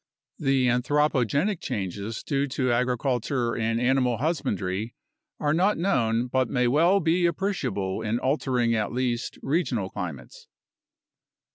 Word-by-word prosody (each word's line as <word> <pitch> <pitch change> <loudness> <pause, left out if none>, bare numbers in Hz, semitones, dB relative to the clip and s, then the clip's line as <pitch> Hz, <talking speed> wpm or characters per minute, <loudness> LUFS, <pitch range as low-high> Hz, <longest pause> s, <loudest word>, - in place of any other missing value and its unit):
The 135 -2 +2
anthropogenic 140 - +1
changes 100 +3 -4
due 140 -1 0
to 130 -1 0
agriculture 125 0 0
and 115 0 0
animal 125 -1 +2
husbandry 115 - -2 0.4
are 150 -1 +1
not 190 +6 +2
known 120 - +1
but 130 0 0
may 125 -2 +1
well 170 +10 +4
be 175 0 +2
appreciable 135 - -2
in 110 +2 -1
altering 125 -3 +1
at 110 -2 0
least 120 -1 -2
regional 130 - -1
climates. 80 -10 -7
125 Hz, 120 wpm, -26 LUFS, 115-145 Hz, 0.4 s, well